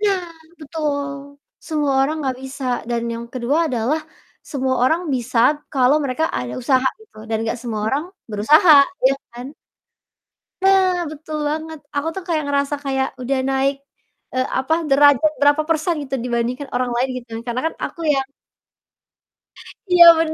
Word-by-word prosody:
Nah, 390 -4 +1 0.4
betul, 285 -2 -4 0.2
semua 295 -3 -1
orang 280 +4 +1
nggak 260 -1 -2
bisa 265 0 -7 0.2
dan 235 -1 -1
yang 235 0 -6
kedua 275 +7 0
adalah 255 +5 0 0.5
semua 265 -2 0
orang 320 +7 +3
bisa 245 -1 -2 0.3
kalau 265 +1 +4
mereka 270 +4 -1
ada 125 0 -5
usaha 260 +1 +1
gitu, 440 - -21
dan 225 - 0
nggak 230 +2 -2
semua 225 -3 -4
orang 285 +6 -1 0.3
berusaha, 300 - +5 0.3
iya 270 - +5 0.2
kan? 245 +2 -8 1.2
Nah, 385 -1 +4 0.2
betul 310 0 -6
banget 315 0 -4 0.2
aku 285 +3 -1
tuh 385 - -4 0.2
ngerasa 280 0 0
kayak 265 -1 0
udah 265 +2 -1
naik, 270 +1 +1 0.6
eee, 255 0 +1
apa 265 +5 0 0.2
derajat 285 +1 +5
berapa 290 +2 +4
persen 325 +2 +1
gitu, 270 -1 -4
dibandingkan 245 +3 -2
orang 250 -1 0
lain 255 +2 0
gitu 245 -1 -9
kan 225 - -5
karena 240 +1 -2
kan - - -5
aku 335 - -8
yang 270 0 -1 1.6
Iya 355 -1 +8
bener 315 -1 0
275 Hz, 150 wpm, -20 LUFS, 255-310 Hz, 1.6 s, Iya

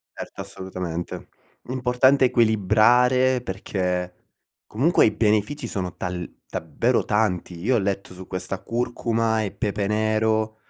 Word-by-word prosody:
Certo, - - -8
assolutamente. 90 -3 -6 0.4
Importante 130 +1 +3
equilibrare 120 +4 +3
perché 90 -3 -3 0.5
comunque 140 +11 +3
i 110 - +4
benefici 110 +8 +1
sono 90 -3 -4
tal 90 -2 -4 0.2
davvero 115 - 0
tanti. 95 -5 0
Io 125 +7 +2
ho - - +3
letto 100 -2 -2
su 90 0 -10
questa 95 +1 -5
curcuma 115 -2 0
e 100 - -3
pepe 100 0 -2
nero, 110 +1 +1
110 Hz, 120 wpm, -24 LUFS, 95-120 Hz, 0.5 s, i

